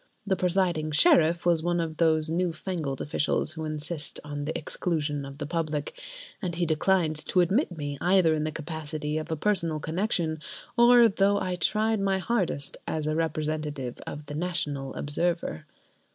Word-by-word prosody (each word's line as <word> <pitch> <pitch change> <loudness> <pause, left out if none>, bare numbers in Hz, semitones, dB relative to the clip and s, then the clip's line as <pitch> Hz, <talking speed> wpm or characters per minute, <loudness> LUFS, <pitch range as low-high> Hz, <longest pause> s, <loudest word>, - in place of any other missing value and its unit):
The 195 -2 +2
presiding 175 -3 +1
Sheriff 160 +3 +4
was 170 -2 +3
one 175 +1 0
of 160 -2 -3
those 160 -2 +3
new 170 +2 0
fangled 160 -5 -4
officials 150 +1 +1
who 160 0 -5
insist 155 0 -2
on 145 -1 -5
the 155 - -2
exclusion 150 -3 -2
of 140 0 -9
the 145 - -4
public, 155 -2 -2 0.5
and 180 -4 -2
he 175 0 +1
declined 160 -1 +1
to 185 - +2
admit 180 - +2
me 145 -2 -4
either 180 -3 +4
in 155 -1 0
the 155 - -1
capacity 155 -1 -4
of 155 +1 -7
a 160 - 0
personal 165 -3 0
connection 165 -1 -1 0.4
or, 240 -1 +7
though 200 -1 +2
I 185 - -2
tried 215 +5 +1
my 195 -1 +1
hardest, 185 - -1
as 155 -1 -2
the 155 0 0
representative 155 -5 -2
of 150 0 -6
"The 145 - -7
National 150 -5 -2
Observer." 165 - -2
160 Hz, 165 wpm, -27 LUFS, 150-180 Hz, 0.5 s, or